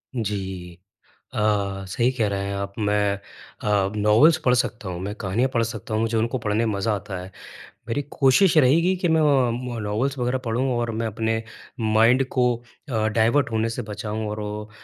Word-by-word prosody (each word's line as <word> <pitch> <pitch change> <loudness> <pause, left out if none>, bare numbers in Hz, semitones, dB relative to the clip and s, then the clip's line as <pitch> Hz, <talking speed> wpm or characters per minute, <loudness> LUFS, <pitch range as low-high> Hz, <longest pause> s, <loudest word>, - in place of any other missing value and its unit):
जी। 95 -6 -4 0.6
अ, - - -3 0.5
सही 120 +7 +1
कह 115 -5 0
रहे 100 -1 -2
हैं 100 - -3
आप। 100 0 -4
मैं 105 -1 +1 0.5
अ, 100 -2 +1
नॉवल्स 105 +10 +5
पढ़ 125 - +4
सकता 120 -4 -1
हूँ, 90 -1 -5
मैं 100 +2 -4
कहानियाँ 110 +5 0
पढ़ 115 - +3
सकता 110 -2 -4
हूँ, 110 - +1
मुझे 115 0 0
उनको 115 +4 0
पढ़ने 110 0 0
में 110 - 0
मज़ा 100 +2 0
आता 100 -1 -5
है। 90 +1 -9 0.6
मेरी 140 +5 -1
कोशिश 145 +7 +4
ये 155 - +7
रहेगी 165 +8 +4
कि 180 -1 -1
मैं 160 0 +3
अम, 125 -4 +2
नॉवल्स 110 +7 -1
वगैरह 125 +1 0
पढ़ूँ 120 +2 0
और 120 -1 -1
मैं 115 +1 -2
अपने 110 +1 -1 0.4
माइंड 115 +4 +4
को 125 - +3 0.5
अ, 110 -3 +1
डायवर्ट 115 +5 +2
होने 110 0 +1
से 115 - -4
बचाऊँ 105 +1 -4
और 105 0 -4
वो 105 0 -5
110 Hz, 190 wpm, -23 LUFS, 105-125 Hz, 0.6 s, ये